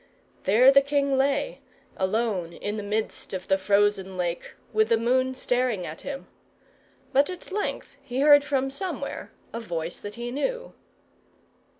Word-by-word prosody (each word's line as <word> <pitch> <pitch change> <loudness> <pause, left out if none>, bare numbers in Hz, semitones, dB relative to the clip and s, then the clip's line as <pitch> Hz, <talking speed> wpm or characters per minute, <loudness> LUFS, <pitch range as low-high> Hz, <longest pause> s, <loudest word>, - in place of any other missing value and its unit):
There 235 +8 +7
the 275 0 +7
king 280 -1 +1
lay, 280 - +1 0.4
alone 190 -3 -1
in 205 +4 -4
the 215 - -3
midst 210 -1 -3
of 185 - -6
the 190 0 +3
frozen 200 -1 +2
lake, 175 -1 -3 0.2
with 220 +1 +3
the 230 - +4
moon 255 +3 +1
staring 245 -7 0
at 155 - -7
him. 275 -1 -6 0.9
But 280 +4 +4
at 365 0 -8
length 395 -7 -3
he 265 -1 -3
heard 290 0 +7
from 270 -2 0
somewhere 375 +6 -5 0.2
a 230 - -3
voice 170 -6 -4
that 205 0 -8
he 240 0 -5
knew. - - -3
240 Hz, 155 wpm, -26 LUFS, 200-275 Hz, 0.9 s, There